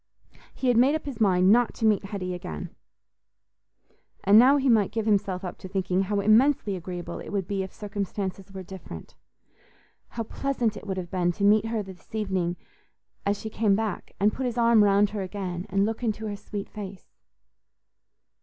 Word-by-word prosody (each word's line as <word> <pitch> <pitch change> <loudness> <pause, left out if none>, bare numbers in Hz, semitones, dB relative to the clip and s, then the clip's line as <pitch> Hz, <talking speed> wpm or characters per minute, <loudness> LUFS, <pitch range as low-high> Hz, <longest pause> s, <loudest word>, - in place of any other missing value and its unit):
He 260 - 0
had 245 - +3
made 265 +5 +5
up 315 - -4
his 265 -6 -6
mind 185 -2 +4
not 240 +1 +3
to 225 - -2
meet 210 -2 +3
Hetty 190 -3 -4
again; 80 - -7 1.5
and 205 +3 +7
now 265 +4 +6
he 275 -1 0
might 220 -5 +4
give 225 -1 -2
himself 200 -3 +1
up 180 - -6
to - - -8
thinking 185 -1 0
how 200 +1 0
immensely 215 0 +3
agreeable 180 0 -6
it - - -8
would 195 -3 -2
be 195 0 -1
if 190 - -5
circumstances 200 -2 -5
were 190 -1 -7
different—how 190 - -12
pleasant 240 -1 -1
it 210 - -9
would 190 -1 -3
have 175 -2 -5
been 175 -2 +1
to 200 - -4
meet 210 +2 +4
her 225 -2 -2
this 190 +2 -12
evening 190 -5 -1 0.7
as 200 0 +1
she 220 - -6
came 210 -3 +2
back, 215 -2 -4
and 205 +1 +3
put 260 -1 -2
his 245 -1 -4
arm 230 -2 +5
round 200 0 +4
her 205 -1 -3
again 185 -1 -5
and 195 +1 +2
look 225 +2 -3
into 220 -2 -2
her 210 -1 -3
sweet 200 0 -6
face. 200 -3 -8
205 Hz, 185 wpm, -26 LUFS, 190-220 Hz, 1.5 s, and